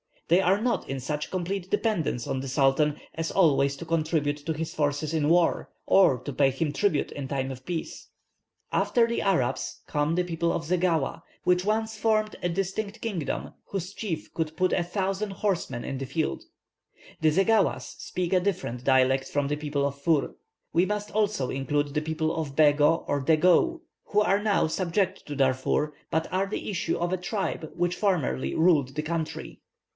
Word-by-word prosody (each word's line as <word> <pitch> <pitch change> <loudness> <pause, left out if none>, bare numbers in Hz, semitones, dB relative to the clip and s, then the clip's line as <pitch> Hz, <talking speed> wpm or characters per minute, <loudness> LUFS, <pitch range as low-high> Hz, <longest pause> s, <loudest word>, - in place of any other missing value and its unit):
They 175 +3 +5
are 195 +3 +2
not 245 0 -1
in 135 0 -2
such 150 +3 -3
complete 185 +1 -3
dependence 205 - 0
on 135 - -2
the 135 - -5
Sultan 140 +2 +2 0.2
as 165 0 -3
always 140 -6 +3
to 155 - -8
contribute 155 -3 0
to 160 - +1
his 155 +1 -4
forces 145 +1 -1
in 155 -2 +1
war, 170 0 +3 0.2
or 180 -10 +5
to 135 +4 -6
pay 135 +1 +4
him 145 +3 -1
tribute 155 0 0
in 140 -2 -5
time 135 -1 -2
of 130 0 -9
peace." 170 -3 -5 0.6
After 235 -1 +3
the 235 0 -1
Arabs 180 -11 0
come 150 +2 0
the 180 - +2
people 170 -1 -1
of 165 - -2
Zeghawa, 165 -2 0 0.2
which 180 +1 +2
once 220 +1 0
formed 215 -1 +1
a - - 0
distinct 195 +4 -3
kingdom, 190 -10 -3
whose 190 0 -5
chief 175 -9 -5
could 160 -1 -2
put 185 0 +2
a 175 - +2
thousand 195 +3 -2
horsemen 185 -11 -2
in 135 - -4
the 135 - -3
field. 155 +4 -2 0.7
The 155 - +4
Zeghawas 195 +6 +2
speak 180 -2 -3
a 185 - +5
different 165 -10 -3
dialect 130 0 +3
from 145 -1 -1
the 150 - -1
people 145 -2 -1
of 140 0 -4
Für. 150 -2 +1 0.4
We 175 +2 +4
must 210 +1 -3
also 205 -11 0
include 145 +2 -1
the 150 - 0
people 160 0 -1
of 150 -4 -4
Bego 150 +1 +4
or 145 - 0
Dageou, 180 - +3 0.2
who 210 - +2
are 200 -1 +2
now 210 -1 +2
subject 185 +3 -1
to 145 - -5
Darfur, 135 +2 +1 0.2
but 160 0 -1
are 190 +2 +1
the 210 - -4
issue 175 -3 -1
of 175 +1 -1
a - - +1
tribe 180 -4 -3
which 175 0 0
formerly 130 - 0
ruled 150 -6 +3
the 150 - -2
country. 160 0 -4
165 Hz, 180 wpm, -27 LUFS, 145-190 Hz, 0.7 s, They